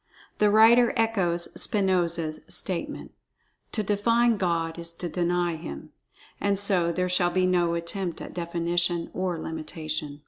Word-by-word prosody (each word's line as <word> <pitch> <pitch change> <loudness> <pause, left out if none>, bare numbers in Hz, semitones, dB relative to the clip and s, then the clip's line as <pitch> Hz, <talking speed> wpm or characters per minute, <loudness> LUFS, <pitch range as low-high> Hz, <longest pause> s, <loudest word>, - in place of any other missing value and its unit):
The 210 - +4
writer 230 +4 +6
echoes 190 -7 0
Spinoza's 175 -5 0
statement: - - -2 0.6
"To 215 - -1
define 230 +3 +2
God 170 -3 -1
is 170 0 0
to 175 +1 -5
deny 175 0 0
Him." 70 - -8 0.5
And 200 -1 0
so 185 -4 +3
there 180 +2 -1
shall 180 -1 +2
be 185 +1 +1
no 175 -2 +2
attempt 170 +1 -3
at - - -8
definition 170 0 -1
or 185 -2 -2
limitation. 155 -2 -5
175 Hz, 135 wpm, -26 LUFS, 170-200 Hz, 0.6 s, writer